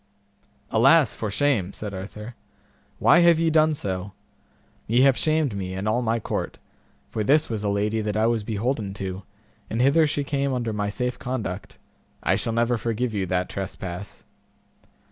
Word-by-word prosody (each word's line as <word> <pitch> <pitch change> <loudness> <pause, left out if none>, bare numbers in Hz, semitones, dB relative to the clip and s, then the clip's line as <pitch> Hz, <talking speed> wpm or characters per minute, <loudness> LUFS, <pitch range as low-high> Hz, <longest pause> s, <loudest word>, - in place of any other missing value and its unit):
Alas, - - +5
for 110 - -4
shame! 105 -4 +1
said 105 -2 -6
Arthur, 105 +4 -7 0.6
why 170 - +5
have 170 -1 +6
ye 165 -1 +2
done 155 0 +4
so? 95 -5 -4 0.7
ye 120 +3 +3
have 135 -1 +5
shamed 155 -7 +1
me 95 -1 -4
and 95 +3 -3
all 110 +3 +1
my 115 -1 0
court, - - -4 0.5
for 110 - -1
this 150 +5 +3
was 110 -2 -3
a 105 - 0
lady 105 +2 0
that 105 0 -2
I 110 - +3
was 115 -2 +1
beholden 110 -1 -2
to, 95 -1 -5 0.5
and 115 - -2
hither 145 +5 +4
she 145 0 -1
came 140 -1 -1
under 120 -3 -2
my 105 -1 -1
safe 125 +4 -3
conduct; 110 -7 -5 0.5
I - - +3
shall 115 - -2
never 120 0 +1
forgive 115 +1 -2
you 95 -3 -1
that 90 0 0
trespass. 95 -1 -6
110 Hz, 170 wpm, -24 LUFS, 100-130 Hz, 0.7 s, have